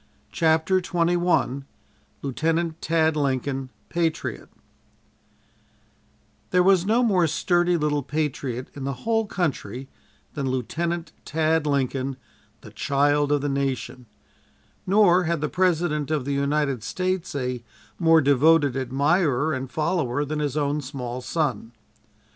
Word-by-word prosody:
CHAPTER 165 +3 +2
XXI 175 -6 +1 0.6
LIEUTENANT 160 +4 -1
TAD 160 -1 +2
LINCOLN, 135 -2 -1 0.2
PATRIOT 165 -2 -2 2.0
There 180 0 +3
was 190 -1 +4
no 235 +3 +3
more 185 -7 +3
sturdy 175 +2 +2
little 150 -2 0
patriot 135 -4 -3
in 140 - -7
the 135 +1 -2
whole 225 -1 +1
country 135 -7 -3 0.4
than 140 -3 -2
Lieutenant 165 +7 -2
Tad 160 0 +1
Lincoln, 135 -1 -1 0.4
"the 110 - -12
child 145 +5 +1
of 145 -1 +2
the 145 - -1
nation," 130 -3 -3 0.8
nor 185 -2 +5
had 170 -1 0
the 150 - -1
President 170 -5 +1
of 150 -4 -1
the 140 - -1
United 140 -2 0
States 185 - -2
a 125 -3 -3 0.4
more 165 -2 +5
devoted 145 +1 +4
admirer 140 +3 +1
and 130 0 -4
follower 145 -3 -1
than 150 +1 -3
his 145 -1 -2
own 145 0 0
small 130 -2 -5
son. 125 -6 -2
150 Hz, 120 wpm, -24 LUFS, 135-170 Hz, 2.0 s, nor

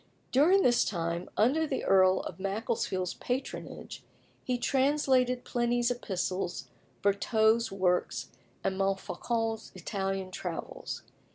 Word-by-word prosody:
During 350 +9 +5
this 240 -1 +4
time, 170 -1 -2
under 285 +9 +3
the 270 - -2
Earl 185 -1 +5
of - - -7
Macclesfield's 195 -2 -1
patronage, 255 +2 -5 0.4
he 250 -1 0
translated 260 -1 +2
Pliny's 240 0 +1
epistles, 185 - -3 0.3
Vertot's 220 +3 +3
works, 185 -2 0 0.3
and 190 0 -1
Montfaucon's 225 +3 -1
Italian 195 -2 -3
travels. 180 -2 -5
220 Hz, 100 wpm, -30 LUFS, 190-245 Hz, 0.4 s, During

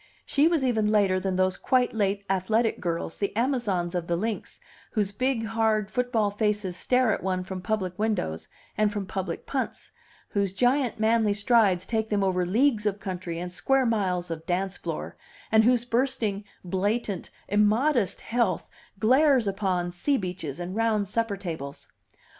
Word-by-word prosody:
She 290 +2 +3
was 325 -5 +2
even 220 -4 +2
later 200 -3 +3
than 190 0 -2
those 185 0 +1
quite 255 -1 +2
late 200 -2 0
athletic 215 +5 +1
girls, 170 -2 -3
the 200 0 -2
Amazons 225 -9 0
of 175 -2 -2
the 170 - +1
links, 215 +4 -4 0.3
whose 205 -3 0
big, 245 +2 0
hard 220 -2 +1
football 235 -4 +1
faces 210 -3 -1
stare 250 +3 +2
at - - -3
one 185 -1 -1
from 185 0 -6
public 190 -3 -2
windows 205 - -1 0.3
and 210 -1 +2
from 205 -2 -3
public 190 0 -4
punts, - - -4 0.4
whose 200 -2 0
giant, 245 +3 +1
manly 220 -1 +3
strides 205 -4 +3
take 220 -1 -1
them 205 -2 +1
over 180 -2 +1
leagues 220 +1 +2
of 200 0 -1
country 180 -3 -5
and 180 +1 -5
square 270 +8 +2
miles 185 -6 0
of 160 -1 -5
dance 190 +2 -1
floor, - - -5 0.3
and 220 0 +5
whose 245 -1 +3
bursting, 235 -5 -1 0.2
blatant, 200 +1 -1 0.2
immodest 210 - +2
health 230 -7 -1 0.3
glares 260 +4 +4
upon 190 -3 -1
sea 275 +11 0
beaches 180 - -5
and 180 +2 -5
round 220 -2 +1
supper 225 0 -1
tables. 160 -7 -6
205 Hz, 160 wpm, -26 LUFS, 185-230 Hz, 0.4 s, and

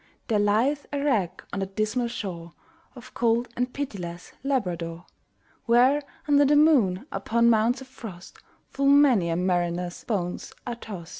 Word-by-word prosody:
There 215 -2 +2
lieth 230 +8 +1
a 285 - -2
wreck 215 - 0
on 200 - -2
the 195 - -2
dismal 215 +5 -1
shore 175 -7 -6 0.4
Of 245 - -13
cold 235 +1 +1
and 250 +1 -1
pitiless 180 -12 -6
Labrador; 175 -10 -2 0.6
Where, 250 +5 +4 0.3
under 290 -1 +5
the 290 +1 +4
moon, 265 - +4
upon 235 +1 +2
mounts 230 +4 +2
of 265 - -10
frost, 200 -8 -11 0.3
Full 275 0 0
many 270 -11 +5
a 165 - 0
mariner's 175 0 -1
bones 180 -6 -3
are 240 - -3
tost. 200 -8 -9
225 Hz, 150 wpm, -26 LUFS, 180-260 Hz, 0.6 s, under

